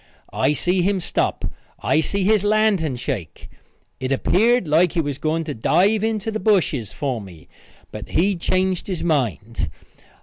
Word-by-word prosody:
I 150 - +2
see 180 +5 0
him 195 +2 +1
stop. - - -1 0.3
I 155 - +2
see 200 +4 -1
his 210 +1 +3
lantern 205 -9 +2
shake. 120 - -5 0.5
It 130 +1 -3
appeared 220 - +2
like 160 +3 +3
he - - 0
was 145 -3 -2
going 160 +1 0
to 155 -2 -4
dive 200 - +2
into 220 -1 -1
the 220 - -3
bushes 170 - +1
for 130 -6 -3
me, 90 -5 -13 0.4
but - - -8
he 195 +4 +2
changed 185 +1 0
his 185 -4 -3
mind. 115 - -1
170 Hz, 160 wpm, -21 LUFS, 135-200 Hz, 0.5 s, his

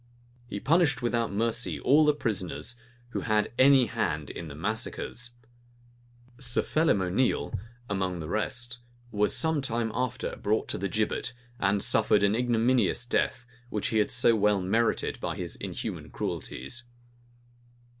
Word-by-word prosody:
He 105 - -4
punished 150 - +2
without 120 -1 0
mercy 115 +4 0
all 150 +4 +5
the 150 -1 +4
prisoners 110 - -2 0.3
who - - -3
had 105 0 +1
any 135 -1 +7
hand 75 - -2
in 85 - -7
the 70 - -8
massacres. 115 +5 -3 1.1
Sir 125 -3 +2
Phelim 155 - +2
O'Neale, 100 +8 0 0.3
among 95 -3 -1
the 80 -2 -5
rest, 120 +5 -2 0.3
was 105 -1 +2
some 160 -2 +2
time 115 -3 -1
after 125 -1 -2
brought 110 +2 0
to - - -2
the 100 +1 -2
gibbet, 110 +4 -1 0.3
and 100 +1 +2
suffered - - +3
an 100 0 +4
ignominious 120 +1 +2
death, 120 0 0 0.2
which 105 -3 -1
he 110 - +2
had 105 - +2
so 120 -1 +4
well 105 -1 +3
merited 110 +5 +1
by - - -3
his - - -4
inhuman - - -5
cruelties. 95 - -5
115 Hz, 145 wpm, -28 LUFS, 100-125 Hz, 1.1 s, any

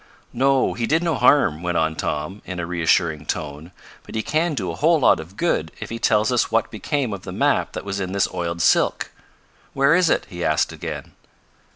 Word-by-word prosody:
"No, 135 +1 +2
he 115 -1 -2
did 160 +3 +2
no 170 -2 +1
harm," 105 - +3
went 90 -1 -1
on 80 0 +1
Tom, 85 +7 -4
in 90 -1 -6
a 85 - -2
reassuring 85 -3 0
tone. 75 +3 -5 0.3
"But - - -11
he 110 - -1
can 155 +1 0
do - - -2
a - - -6
whole 160 +2 +3
lot 130 - +4
of 85 +5 -11
good 80 - 0
if - - -7
he 115 - -4
tells 110 +2 +2
us 125 - +1
what 115 0 +1
became 125 +2 -2
of 100 - -6
the - - -8
map - - +1
that - - -6
was 100 0 -3
in 95 -1 -3
this 100 0 +1
oiled 85 0 -2
silk. - - +2 0.6
Where 140 +2 +4
is 180 -1 +4
it?" - - +1
he 85 -1 -6
asked 75 0 +1
again. - - -7
100 Hz, 215 wpm, -22 LUFS, 85-135 Hz, 0.6 s, lot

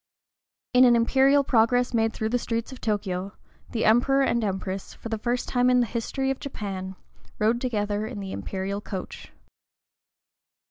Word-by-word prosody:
In 250 +1 +7
an 245 -2 +6
imperial 270 +4 +4
progress 245 0 +2
made 225 -1 +2
through 220 0 -3
the 245 +2 +1
streets 230 +2 -3
of 260 - -10
Tōkyō, 195 -2 -2 0.4
the 230 - -1
Emperor 260 +5 +4
and 235 -3 +1
Empress, 190 -1 -4
for 230 - -8
the 225 -1 -2
first 245 +2 -1
time 250 0 +2
in 250 0 +4
the 245 - +3
history 250 +4 -2
of 270 - -4
Japan, 190 -7 -5 0.4
rode 225 +3 +1
together 210 -4 -1
in 225 -3 -6
the 195 -1 -6
imperial 195 +1 -4
coach. 190 -3 -7
230 Hz, 165 wpm, -25 LUFS, 205-250 Hz, 0.4 s, In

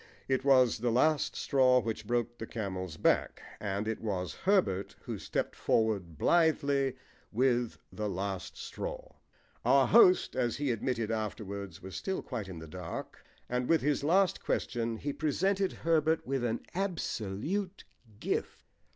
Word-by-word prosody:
It 130 -1 +1
was 130 -4 +5
the 120 +2 +1
last 150 +6 +2
straw 130 -2 +4
which 110 -2 -4
broke 120 0 -1
the 110 - -5
camel's 95 -7 -4
back, - - +2 0.2
and 100 +1 -2
it 110 - -2
was 95 -5 -2
Herbert 185 - +1
who - - -5
stepped - - -2
forward 100 -8 0
blithely 140 - +2 0.4
with 120 0 +1 0.2
the 105 -1 -2
last 95 0 -4
straw. - - -6 0.5
Our - - +5
host, 370 -3 +6
as 120 -3 0
he 140 -2 0
admitted 115 -1 -1
afterwards, 100 -4 -4
was 95 - -8
still 190 -1 -3
quite 115 -7 -5
in 90 - -7
the 80 0 -8
dark, 85 +1 -7 0.2
and 125 0 -1
with 165 -1 +4
his 145 0 +1
last 185 +4 +3
question 115 -1 -1
he 145 +5 -3
presented 190 +7 +1
Herbert 160 -1 +1
with 135 -1 -1
an 115 -1 -1
absolute 180 - -2 0.4
gift. - - -2
120 Hz, 145 wpm, -31 LUFS, 105-155 Hz, 0.5 s, host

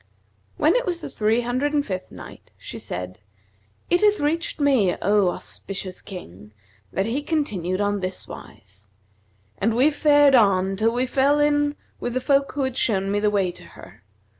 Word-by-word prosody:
When 315 +7 +3
it - - 0
was 345 -2 -2
the - - -7
Three 220 +2 +1
Hundred 255 +5 -1
and 290 -1 +1
Fifth 185 -2 -5
Night, - - -12
She - - -8
said, 90 +1 -6 0.7
It 350 - +2
hath 420 -1 +4
reached 315 +4 -1
me, 260 -11 +3
O 200 -1 +3
auspicious 185 +1 -6
King, 105 - -11 0.4
that 195 - -1
he 240 +6 -1
continued 205 - -2
on 205 0 0
this 185 0 -4
wise: 100 +1 -13 0.7
"And 225 +3 +1
we 270 +6 +4
fared 290 -1 +4
on 195 -5 +4
till 220 +3 +2
we 250 +1 +1
fell 275 +3 +2
in 290 0 +2 0.2
with 245 - -4
the - - +2
folk 275 +1 +2
who 280 - -1
had 260 -1 -3
shown 195 -3 0
me 205 - +1
the 210 0 +2
way 195 -3 +1
to - - -14
her. - - -15
230 Hz, 180 wpm, -23 LUFS, 190-290 Hz, 0.7 s, hath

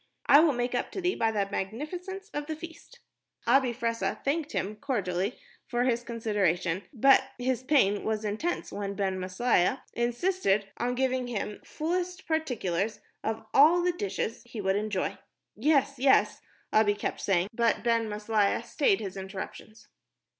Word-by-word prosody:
I 285 - +8
will 310 -2 +5
make 245 0 -1
up 245 - -1
to - - -3
thee 360 +1 +1
by 225 - +1
the 205 -2 0
magnificence 350 - -5
of 295 0 -3
the 315 - -3
feast." 335 +9 -12 0.4
Abi 260 +1 +4
Fressah 230 -1 -2
thanked 295 +2 -1
him 210 +2 -2
cordially 200 -3 -2 0.3
for 240 0 0
his 240 -2 +1
consideration, 200 -7 0
but 270 +1 +5
his 250 0 -1
pain 255 -8 +3
was 220 0 -1
intense 220 +12 -2
when 200 -1 -4
Ben 190 -2 -1
Maslia 185 +5 +1
insisted 240 - +1
on 245 +1 -1
giving 260 -1 0
him 210 -3 -4
fullest 360 +3 -3
particulars 225 - -1 0.2
of 220 0 -3
all 320 +6 +6
the 360 - +3
dishes 215 - -3
he 235 -2 -9
would 190 -1 +1
enjoy. 205 -2 -2 0.4
"Yes, 275 +2 +2
yes," 265 +1 +3 0.3
Abi 210 -1 +4
kept 205 - -3
saying, 190 -1 +1
but 230 0 +1
Ben 230 -2 +2
Maslia 210 -1 +1
stayed 400 -5 +1
his 195 -2 -5
interruptions. 195 +3 -8
235 Hz, 155 wpm, -28 LUFS, 205-280 Hz, 0.4 s, I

